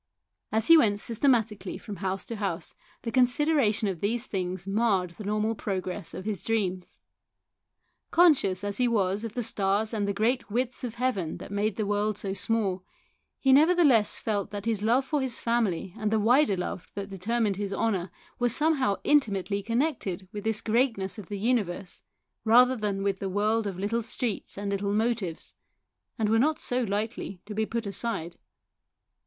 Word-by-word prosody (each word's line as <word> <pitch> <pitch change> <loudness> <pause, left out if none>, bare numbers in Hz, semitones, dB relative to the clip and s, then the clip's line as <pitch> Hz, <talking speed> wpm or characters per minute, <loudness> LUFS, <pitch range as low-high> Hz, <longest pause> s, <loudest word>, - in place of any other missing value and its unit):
As 220 0 +2
he 330 - +8
went 205 -6 +2
systematically 225 -5 0
from 205 -2 -8
house 190 +2 -3
to 230 - -5
house 195 -4 -3 0.3
the 230 - -3
consideration 255 -3 +2
of 185 -4 -3
these 230 +4 -1
things 185 -3 -3
marred 195 -3 +1
the 210 - -10
normal 215 +2 0
progress 190 -2 -4
of 185 - -7
his 210 -3 -3
dreams. 190 -5 -2 1.1
Conscious 275 - +4
as 205 +2 -2
he 250 - +4
was 200 -3 +1
of 225 -2 -6
the 245 - -1
stars 210 +1 0
and 205 -2 -1
the - - +1
great 230 +5 0
widths 250 +4 -2
of 240 -2 -4
heaven 235 -10 -1
that - - -10
made 205 +1 0
the 215 - -1
world 205 0 0
so 195 -2 -3
small, 195 -2 -1 0.5
he 265 -1 +3
nevertheless 290 -7 +5
felt 205 -3 -2
that 205 0 -6
his 225 -3 0
love 240 +5 +2
for 295 +1 0
his 260 -3 -2
family 210 -7 0
and 215 -2 -1
the 220 0 +2
wider 240 0 +4
love 180 -1 -5
that 200 0 -5
deter 200 +5 -2
mined 205 -4 +1
his 200 -1 -3
honour 195 -3 0 0.3
were 245 0 +2
somehow 270 -5 +2
intimately 200 -8 +2
connected 230 - -1
with 205 -2 -6
this 220 -1 0
greatness 220 -4 0
of 195 - -9
the 205 - -4
universe 200 -5 -1 0.4
rather 250 +3 +6
than 205 -4 -2
with 195 -1 0
the 195 - -3
world 210 +3 +1
of 190 -3 -4
little 210 +5 -1
streets 225 -2 -4
and 200 0 -3
little 200 0 -1
motives, 215 -7 -1 0.6
and 220 - +1
so - - 0
were 225 - +4
not 305 +2 +1 0.2
lightly 205 -2 -3
to 210 - -7
be 220 +1 -1
put 230 -1 -3
aside. 200 -5 -3
215 Hz, 180 wpm, -27 LUFS, 195-235 Hz, 1.1 s, he